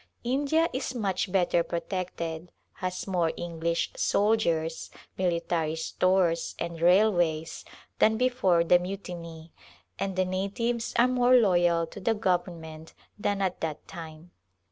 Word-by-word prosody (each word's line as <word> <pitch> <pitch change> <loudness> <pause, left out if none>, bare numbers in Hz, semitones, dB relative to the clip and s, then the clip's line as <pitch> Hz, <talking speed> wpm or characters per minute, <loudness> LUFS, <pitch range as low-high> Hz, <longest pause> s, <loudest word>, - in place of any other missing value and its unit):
India 285 +6 +2
is 260 0 -3
much 195 -5 -1
better 180 -2 +2
protected 170 -1 -4
— - - -46
has 180 -1 -3
more 175 -4 +1
English 170 0 -2
soldiers, 170 -7 +1 0.3
military 170 -3 0
stores, 170 +1 +1
and 170 -1 -5
railways, 175 -4 +2 0.4
than 220 0 +4
be 250 +2 +3
fore 185 -9 +2
the 175 +1 +5
mutiny, 170 -3 -7 0.5
and 195 -1 -2
the 185 0 +2
natives 200 +6 -2
are 240 +1 +5
more 250 0 +4
loyal 175 -7 +4
to 165 - -11
the 225 +3 +1
government 170 -5 -3 0.2
than 200 -1 0
at 185 -1 -2
that 155 -2 -4
time. 160 +1 -10
180 Hz, 130 wpm, -27 LUFS, 165-205 Hz, 0.5 s, the